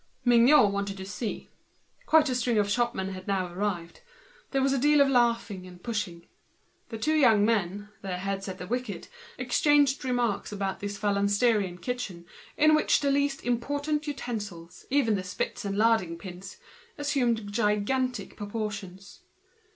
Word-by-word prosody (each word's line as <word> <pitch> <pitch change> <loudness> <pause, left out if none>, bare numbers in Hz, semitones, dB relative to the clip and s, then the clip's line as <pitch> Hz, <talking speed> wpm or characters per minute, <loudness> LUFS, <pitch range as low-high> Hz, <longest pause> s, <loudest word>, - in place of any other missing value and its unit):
Mignot 240 -1 +6
wanted 200 0 -3
to 190 - -7
see. 205 +3 -5 0.6
Quite 310 -1 +5
a 260 - 0
string 245 -2 0
of 205 -1 +2
shopmen 220 -3 0
had 185 -1 -8
now 185 -3 -1
arrived; 180 -3 -3 0.5
there 270 - 0
was 270 0 +2
a - - +1
good - - -2
deal 295 +1 +5
of 280 - +6
laughing 230 -6 +1
and 180 -1 -14
pushing. 200 -7 -4 0.6
The 225 - -5
two 305 +8 0
young 230 -9 +5
men, 205 -2 -1
their 185 -2 -4
heads 195 +1 -3
at 190 -1 -5
the 180 - -7
wicket, 245 +1 -4 0.3
exchanged 290 -3 +3
their 260 - -2
remarks 240 -4 0
before 195 -2 -3
this 205 0 -5
phalansterian 205 -1 +1
kitchen, 215 -9 -4 0.3
in 310 +1 +5
which 310 - +3
the 280 -1 +2
least 280 0 0
utensils, 245 - -3
even 265 -5 +2
the 195 -2 -1
spits 185 +2 -4
and 200 0 -2
larding 215 -6 +2
pins, 185 +2 -9 0.4
assumed 245 -8 0
gigantic 235 +4 0
proportions. 205 -2 -6
215 Hz, 155 wpm, -28 LUFS, 195-250 Hz, 0.6 s, Mignot